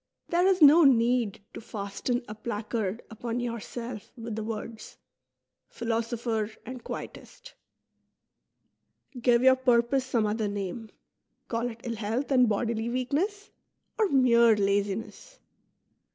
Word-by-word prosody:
There 350 +2 +3
is 375 -4 +4
no 305 +4 +8
need 240 -5 +3
to - - -8
fasten 215 +4 -3
a 210 - -6
placard 215 -1 -4
upon 230 +2 -4
yourself 235 -1 -6
with 230 -2 -6
the 220 - -3
words: 220 0 -7 0.4
" - - -59
Philosopher 230 -1 -1 0.2
and 250 0 -8
Quietist." - - -9 1.7
Give 240 0 +4
your 260 0 +6
purpose 250 +1 +2
some 240 -4 0
other 215 0 -1
name; 205 +2 -5 0.6
call 235 +1 -1
it 230 -1 -11
ill 235 -2 -4
health 225 +7 -2
and 250 -3 +5
bodily 225 +2 -1
weakness, 315 - -2 0.5
or 430 -3 +3
mere 235 -5 +5
laziness. 205 - -2
235 Hz, 125 wpm, -28 LUFS, 220-255 Hz, 1.7 s, no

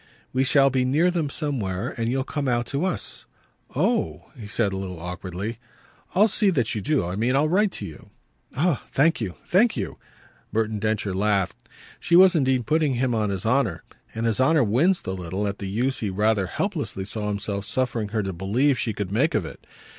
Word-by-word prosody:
"We 130 +1 +2
shall 135 +1 +4
be 130 -1 +1
near 155 +8 +3
them 165 -5 -1
somewhere, 125 - -3
and 115 -1 -1
you'll 130 +2 0
come 145 0 -3
out 120 -1 +1
to 140 +8 -2
us." 185 - -3 0.5
"Oh!" 210 - 0
he 110 -6 -9
said 105 -2 0
a - - -3
little 95 -3 -5
awkwardly. 90 +5 -5 0.6
"I'll 205 +4 +6
see 210 -1 +4
that 125 - +1
you 105 - -2
do. 145 - +1
I 90 +2 -3
mean 120 +5 +1
I'll 145 +3 +3
write 195 +5 +2
to - - -4
you." 80 - -11 0.5
"Ah 155 -3 +1
thank 155 0 +2
you, 95 -5 -3
thank 210 - +3
you!" 100 - -4 0.5
Merton 110 0 0
Densher 105 -2 -1
laughed. 100 -2 0 0.3
She 170 - +2
was 185 +1 +8
indeed 130 -5 +2
putting 150 0 +2
him 125 0 0
on 110 -2 0
his 95 0 -3
honour, 115 -8 +1 0.3
and 115 +1 -2
his 115 +2 +1
honour 150 +2 +4
winced 145 - +2
a - - -2
little 95 +2 -3
at 100 0 -4
the 100 - -4
use 125 +7 0
he 105 - -2
rather 105 0 +1
helplessly 95 +2 -3
saw 105 +1 -4
himself 100 -1 -3
suffering 120 -4 0
her 110 0 -1
to 95 -1 -3
believe 120 +10 +1
she 110 - -1
could 100 -2 -4
make 135 +10 +2
of 105 -6 +1
it. - - -11
115 Hz, 205 wpm, -24 LUFS, 100-140 Hz, 0.6 s, was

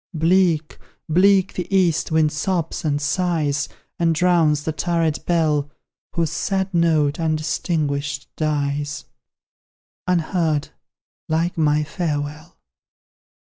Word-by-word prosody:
Bleak, 165 -1 +2 0.3
bleak 190 +3 +4
the 180 -1 -4
east 180 -5 +2
wind 155 -1 +3
sobs 170 +1 -2
and 145 -2 0
sighs, 150 -2 0 0.3
And 165 -1 +2
drowns 160 -4 +3
the 160 - -1
turret 165 -1 -1
bell, 155 -4 +1 0.4
Whose 165 -2 0
sad 190 +2 -1
note, 160 -4 +2
undistinguished, 155 -2 -1
dies 145 -1 -2 1.0
Unheard, 165 -4 0 0.6
like 165 +2 0
my 150 -1 +2
farewell! 150 -1 -4
160 Hz, 95 wpm, -21 LUFS, 150-175 Hz, 1.0 s, bleak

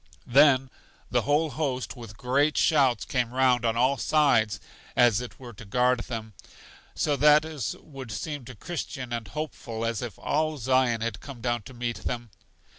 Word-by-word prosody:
Then 135 0 +5 0.4
the - - +3
whole 150 +2 +1
host 130 -2 -2
with 115 -4 -10
great 140 +4 +1
shouts 135 -6 +3
came 120 -2 -1
round 130 -2 +3
on 115 -1 +1
all 130 +3 +3
sides 120 -7 +2 0.4
(as 120 -2 +4
it 125 - -9
were 120 -2 -10
to 110 - -11
guard 125 +4 +2
them); 115 -3 -6 0.6
so 145 - +1
that 150 +2 +5
is 155 -8 -4
would 135 -5 -10
seem 145 +5 -4
to 130 0 -10
Christian 135 -4 -5
and 115 -3 -4
Hopeful 120 -4 -5
as 115 -2 -1
if 120 -4 -6
all 155 0 0
Zion 130 -2 +2
had 115 -3 -3
come 140 -4 -10
down 120 0 -1
to 130 - -12
meet 120 -1 -3
them. 120 -2 -5
125 Hz, 175 wpm, -27 LUFS, 115-145 Hz, 0.6 s, Then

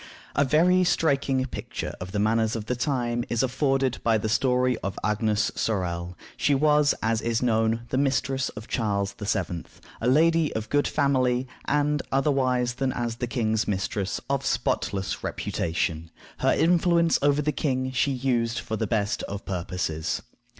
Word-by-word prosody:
A 140 - +4
very 175 +6 +4
striking 140 -6 +1
picture 130 - -5
of 90 0 -6
the 105 - -3
manners 110 +2 +2
of 110 -2 -4
the 125 - -1
time 120 -2 -1
is 120 +1 +1
afforded 130 0 +1
by 115 -1 +3
the 110 +1 -2
story 125 +2 +2
of 95 - -4
Agnes 105 0 +1
Sorel. 90 -4 -2 0.2
She 145 - +2
was, 150 +1 +4
as 115 0 +1
is 115 +1 0
known, 115 -1 +2
the 130 - 0
mistress 135 -1 0
of 110 +2 -8
Charles 100 -3 -1
VII., 95 -5 -2 0.4
a 115 - 0
lady 160 +3 +4
of 110 0 -3
good 145 0 +2
family, 130 -3 +1 0.2
and, 150 0 +1
otherwise 130 -3 +1
than 130 +1 -1
as 120 -2 -3
the 125 - -2
king's 110 -3 0
mistress, 100 0 -2
of 140 0 0
spotless 95 -6 -1
reputation. 80 -1 -2 0.3
Her - - +3
influence 170 -1 +3
over 145 +1 +3
the 150 - +1
king 130 -3 -1
she 130 +2 +1
used 120 -3 0
for 110 - -3
the 110 - -1
best 105 -3 0
of 100 0 -6
purposes. 90 -3 -3
125 Hz, 160 wpm, -26 LUFS, 110-140 Hz, 0.4 s, A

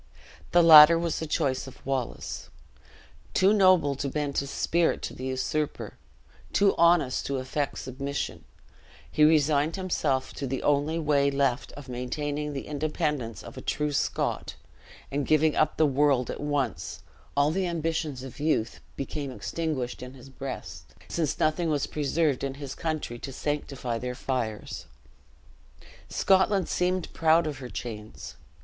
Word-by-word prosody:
The 175 0 +6
latter 160 0 +10
was 170 -1 -1
the 160 - -4
choice 140 -4 0
of 130 - -13
Wallace. 130 -3 -3 0.9
Too 195 +2 +5
noble 185 -8 +5
to 140 - -2
bend 145 0 -2
his 140 - -4
spirit 170 +3 +1
to - - -4
the 130 - -7
usurper, 130 +3 -2 0.6
too 200 -1 +4
honest 170 -6 +3
to 140 - -1
affect 135 +2 -2
submission, 135 - -4 0.7
he 150 - +3
resigned 150 0 +4
himself 155 -8 -1
to 140 - -4
the 130 +1 -3
only 145 +3 +2
way 145 -3 +2
left 140 -2 0
of 145 -2 -10
maintaining 145 +4 -3
the 135 - -5
independence 150 -5 -2
of - - -11
a - - -6
true 150 0 -1
Scot; 140 - -1 0.6
and 140 0 -1
giving 155 0 +3
up 155 - +2
the 160 - +5
world 140 -2 +2
at - - -6
once, 135 - -2 0.3
all 145 +1 +4
the 185 +2 0
ambitions 160 -5 -2
of 135 0 -9
youth 145 -7 0 0.2
became 140 +1 -4
extinguished 135 -2 -3
in 125 +1 -8
his 130 +1 -13
breast, 135 - -7
since 160 -4 -1
nothing 160 +2 +1
was 145 -3 +1
preserved 150 -1 0
in 135 -1 -2
his 140 -2 -6
country 155 -7 -3
to 135 - -6
sanctify 135 -4 -3
their 125 0 -4
fires. 110 -10 -3 1.2
Scotland 190 0 +3
seemed 180 0 -1
proud 165 +1 +4
of 145 -3 -4
her 125 -2 -7
chains. 110 -4 -7
145 Hz, 150 wpm, -27 LUFS, 130-160 Hz, 1.2 s, latter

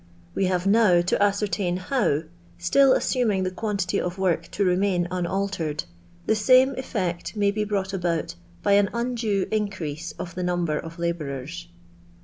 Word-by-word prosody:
We 195 - +1
have 180 -1 0
now 200 -4 +5
to 175 - 0
ascer 205 +1 +2
tain 180 -1 -1
how, 185 - 0 0.3
still 260 +10 +4
assuming 220 -7 +1
the 185 - -1
quantity 195 -1 -1
of 180 +1 -4
work 175 -3 0
to 200 - +1
remain 180 -1 +1
unaltered, 180 -4 -2 0.4
the - - +3
same 255 +5 +5
cH'ect 190 -9 -3
may 205 -1 +2
be 210 +1 -1
brought 195 -2 -2
about 175 -4 -1 0.3
by 200 0 +5
au 200 - +3
undue 235 -5 0
iticrease 170 -7 -3
of 170 - -6
the 180 - -4
number 175 -3 0
of 165 0 -9
labom 155 -6 -3
efs. 170 +4 -8
185 Hz, 160 wpm, -25 LUFS, 175-210 Hz, 0.4 s, now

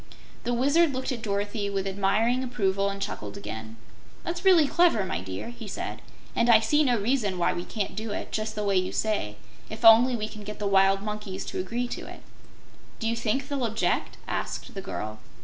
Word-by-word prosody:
The 245 - 0
Wizard 285 +5 +3
looked 260 +1 -2
at 240 -3 -4
Dorothy 205 -1 -2
with 195 -1 -2
admiring 205 +6 +1
approval, 200 -6 0
and 200 0 -5
chuckled 195 - -5
again. 110 - -7 0.5
"That's 345 +1 -4
really 365 -5 +6
clever, 330 - +3
my 85 - -3
dear," 95 - -6
he 240 - -9
said, - - -5 0.3
"and 235 - +2
I 225 -2 +8
see 295 +8 +3
no 250 -4 +3
reason 210 -4 0
why 175 - +2
we 175 - -4
can't 205 +1 -4
do 220 +1 -4
it, 205 - -4
just 215 0 -2
the 210 - -2
way 200 -2 +2
you 185 0 0
say, 205 - -1 0.3
if 220 +2 -4
only 235 +3 +8
we 215 -2 -2
can 215 - -10
get 210 +1 -7
the 210 - -4
wild 195 0 +4
monkeys 210 -3 -5
to - - -4
agree 235 +7 -2
to - - -6
it." - - -11 0.7
"Do 225 - -2
you 230 - +1
think 235 +4 -1
they'll 280 -3 -2
object?" 225 0 0
asked - - -4
the 195 - -5
girl. 110 - -5
215 Hz, 205 wpm, -27 LUFS, 195-245 Hz, 0.7 s, I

